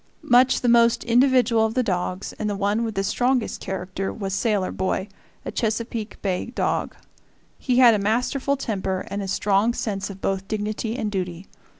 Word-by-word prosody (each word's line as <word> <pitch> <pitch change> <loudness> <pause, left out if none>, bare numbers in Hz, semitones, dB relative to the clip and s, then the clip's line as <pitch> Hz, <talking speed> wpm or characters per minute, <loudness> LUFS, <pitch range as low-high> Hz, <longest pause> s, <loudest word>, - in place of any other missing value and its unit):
Much 250 +2 +4
the 245 - 0
most 235 0 +4
individual 245 -2 +3
of 220 0 -1
the 255 - +2
dogs 185 -2 -2
and 215 - -1
the 205 - -2
one 205 +3 0
with 225 -2 -3
the 195 - 0
strongest 245 +3 0
character 190 0 -4
was 195 -3 -4
Sailor 200 -1 0
Boy, 190 +1 -2 0.4
a - - -4
Chesapeake 225 -1 -3
Bay 185 0 -1
dog. 240 - -2 0.6
He 250 -2 0
had 245 -3 +8
a 210 - +1
masterful 250 +7 0
temper 190 -7 -2
and 200 +1 -2
a 195 - -4
strong 205 +4 +1
sense 195 -3 -3
of 195 -1 -9
both 195 0 -2
dignity 215 +2 -3
and 215 -5 -2
duty. 180 -2 -4
215 Hz, 180 wpm, -23 LUFS, 195-235 Hz, 0.6 s, had